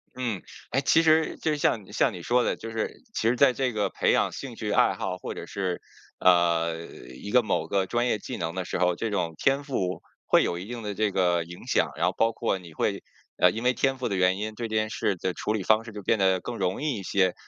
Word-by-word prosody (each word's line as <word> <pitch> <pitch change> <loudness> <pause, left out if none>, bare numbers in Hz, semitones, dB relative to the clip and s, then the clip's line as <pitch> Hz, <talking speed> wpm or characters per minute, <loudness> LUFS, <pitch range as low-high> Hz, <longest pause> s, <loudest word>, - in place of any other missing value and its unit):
嗯， 120 -7 -2 0.3
诶， 135 - +2
其 165 +4 +4
实 160 0 +3
就 155 -1 0
像 115 -7 +1
你 - - -14
像 - - +2
你 90 - -7
说 120 +5 +2
的， - - 0
就 115 - -7
是 110 -1 -4
其 115 - +1
实 125 - +1
在 135 -2 +5
这 130 -1 0
个 105 -2 0
培 - - +1
养 - - +2
兴 - - -7
趣 - - -3
爱 - - +4
好 95 -2 -3
或 - - -6
者 - - -7
是， 95 -3 -3 0.4
呃， 85 -2 +3
一 65 +11 -10
个 125 - +6
某 105 - 0
个 95 -1 +1
专 120 +5 0
业 115 - +1
技 - - -6
能 80 - -3
的 95 -1 -3
时 - - -3
候， 90 -1 +2
这 115 - -2
种 85 -5 -1
天 140 +1 +2
赋 95 -10 -2 0.2
会 - - +4
有 85 - -1
一 95 - -7
定 120 0 -6
的 105 -1 -3
这 105 0 0
个 90 -3 +2
影 85 +1 -11
响， - - +1
然 - - 0
后 - - 0
包 115 0 +3
括 115 -3 -1
你 85 -3 -12
会， - - -1 0.4
呃， 90 - +5
因 115 +4 -5
为 125 +1 +3
天 135 +1 +1
赋 125 -3 -2
的 100 - -1
原 95 +1 +3
因， 110 +1 -4
对 115 +2 -4
这 110 - -4
件 110 0 +1
事 100 - -1
的 90 +1 -2
处 105 - -2
理 105 -3 -2
方 110 +3 +3
式 110 - -9
就 105 - -6
变 110 +3 +2
得 95 -1 +3
更 120 - -5
容 95 +6 -1
易 145 -6 0
一 - - -7
些。 95 -1 +2
105 Hz, 285 characters per minute, -26 LUFS, 90-120 Hz, 0.4 s, 个